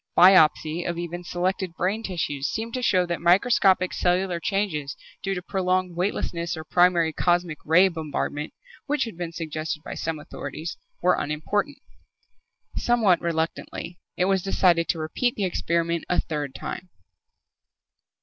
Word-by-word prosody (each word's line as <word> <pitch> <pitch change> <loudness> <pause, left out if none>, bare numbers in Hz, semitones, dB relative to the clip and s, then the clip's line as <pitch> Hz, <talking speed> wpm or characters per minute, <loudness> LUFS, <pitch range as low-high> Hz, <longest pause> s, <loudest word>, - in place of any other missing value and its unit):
Biopsy 175 -2 +6
of 170 - -3
even 175 +1 -5
selected 180 0 -2
brain 195 +7 -1
tissues 150 -9 -2
seemed 225 +1 -4
to 255 - -2
show 185 -6 +3
that 170 -1 -3
microscopic 185 0 +4
cellular 180 0 +1
changes 170 -8 -2 0.2
due 195 0 -2
to 180 - -5
prolonged 185 -2 0
weightlessness 170 -2 -2
or 160 - -6
primary 170 -1 +3
cosmic 175 -3 +1
ray 180 +5 +5
bombardment, 150 -3 -3 0.4
which 290 -3 +1
had 225 -5 -6
been 170 -1 -5
suggested 155 -1 -4
by - - -6
some 165 -1 -3
authorities, 155 +2 -6 0.3
were 180 0 +5
unimportant. 200 - -1 1.0
Somewhat 220 -8 +3
reluctantly, 170 +1 -3 0.2
it 180 - +2
was 195 0 +2
decided 175 -3 +2
to - - +1
repeat 160 +10 -1
the 200 - -1
experiment 170 -1 -1
a 180 - +2
third 145 -4 -3
time. 185 - -6
175 Hz, 140 wpm, -25 LUFS, 165-190 Hz, 1.0 s, Biopsy